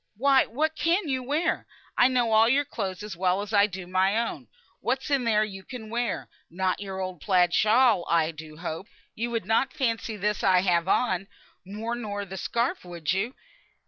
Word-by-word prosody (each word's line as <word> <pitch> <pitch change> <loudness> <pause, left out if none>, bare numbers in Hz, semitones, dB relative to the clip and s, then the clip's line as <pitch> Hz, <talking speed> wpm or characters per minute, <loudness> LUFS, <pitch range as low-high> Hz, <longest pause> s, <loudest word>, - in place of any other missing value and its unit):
"Why, 270 +2 +4
what 310 +6 -1
can 340 +3 +1
you 260 -2 -1
wear? 295 +7 -1 0.3
I 245 - +6
know 245 -3 +1
all 220 +1 +5
your 285 +3 +3
clothes 195 -6 -4
as 210 -4 -6
well 185 +2 +1
as 205 +1 -8
I 205 0 +5
do 190 -2 -7
my 190 +3 +2
own, 230 0 0
and - - -20 0.3
what 265 +2 -1
is - - -6
there 230 -6 +2
you 195 -3 -7
can 220 0 -9
wear? 235 -3 -2 0.2
Not 185 +1 -1
your 195 -1 -5
old 185 -4 -5
plaid 180 -3 +3
shawl, 220 -3 +4
I 165 -1 +3
do 155 -1 -11
hope? 165 +3 -5 0.3
You 235 +2 -3
would 230 -5 -2
not 225 +5 +1
fancy 230 -6 -1
this 210 +1 -1
I 185 -2 +5
have 175 -2 +1
on, 195 -3 +1 0.4
more 215 +4 -4
nor 205 -4 -4
the 190 0 -8
scarf, 235 - -1
would 175 -1 -3
you?" 215 +7 -2
210 Hz, 200 wpm, -26 LUFS, 185-245 Hz, 0.4 s, I